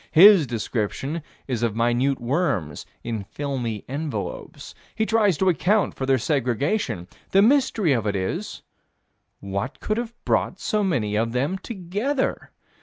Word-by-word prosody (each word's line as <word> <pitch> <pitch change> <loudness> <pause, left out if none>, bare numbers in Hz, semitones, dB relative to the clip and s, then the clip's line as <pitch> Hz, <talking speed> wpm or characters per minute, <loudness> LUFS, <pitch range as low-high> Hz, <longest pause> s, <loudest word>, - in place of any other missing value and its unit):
His 185 -3 +8
description 120 +6 -2 0.3
is 125 -4 -2
of 115 -3 0
minute 120 +4 +1
worms 120 - -1 0.2
in 115 -3 -3
filmy 120 -1 -4
envelopes. 135 - -5 0.2
He 220 - +1
tries 215 -6 +3
to 190 - +1
account 185 +5 +2
for 130 - -4
their 135 -1 +4
segregation. 130 - 0 0.2
The 195 +1 +5
mystery 235 - +3
of 115 -4 0
it 100 - 0
is: 95 -1 -3 0.8
What 100 +8 -4
could 215 - -1
have 235 0 -4
brought - - +1
so 215 -3 0
many 115 - 0
of 115 +2 0
them 140 +9 0
together? 220 +8 -2
135 Hz, 140 wpm, -24 LUFS, 115-195 Hz, 0.8 s, His